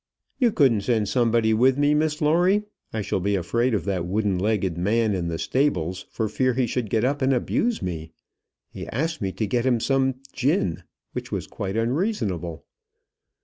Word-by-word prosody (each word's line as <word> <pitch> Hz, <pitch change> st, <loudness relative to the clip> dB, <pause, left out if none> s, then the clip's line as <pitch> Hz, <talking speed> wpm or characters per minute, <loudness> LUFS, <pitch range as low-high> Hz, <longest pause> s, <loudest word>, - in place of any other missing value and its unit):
"You 245 Hz, -4 st, +4 dB
couldn't 130 Hz, -, +3 dB
send 110 Hz, -1 st, +1 dB
somebody 115 Hz, -2 st, +2 dB
with 130 Hz, +4 st, +4 dB
me, 145 Hz, +1 st, +3 dB
Miss 150 Hz, +1 st, 0 dB
Lawrie? 180 Hz, +7 st, +3 dB, 0.3 s
I 110 Hz, -2 st, -2 dB
shall 95 Hz, -, -1 dB
be 100 Hz, +2 st, 0 dB
afraid 115 Hz, +7 st, +1 dB
of 90 Hz, -5 st, -2 dB
that 95 Hz, -3 st, -1 dB
wooden 100 Hz, +1 st, 0 dB
legged 95 Hz, -3 st, 0 dB
man 105 Hz, +5 st, +1 dB
in 90 Hz, -3 st, -2 dB
the 85 Hz, -1 st, -2 dB
stables, 95 Hz, -, -1 dB
for 110 Hz, -, -2 dB
fear 130 Hz, +3 st, 0 dB
he 130 Hz, -1 st, +2 dB
should 120 Hz, -2 st, -2 dB
get 110 Hz, +1 st, +1 dB
up 140 Hz, +3 st, 0 dB
and 130 Hz, +1 st, +3 dB
abuse 220 Hz, -, 0 dB
me. 80 Hz, -3 st, -4 dB, 0.6 s
He -, -, -7 dB
asked 160 Hz, 0 st, -2 dB
me 95 Hz, -2 st, -1 dB
to 100 Hz, +4 st, -1 dB
get 120 Hz, +3 st, 0 dB
him 125 Hz, -2 st, +2 dB
some 135 Hz, +1 st, +1 dB, 0.2 s
gin, 130 Hz, -, 0 dB, 0.3 s
which -, -, -5 dB
was -, -, -2 dB
quite 100 Hz, +2 st, -4 dB
unreasonable." 115 Hz, -, -1 dB
115 Hz, 185 wpm, -24 LUFS, 95-135 Hz, 0.6 s, You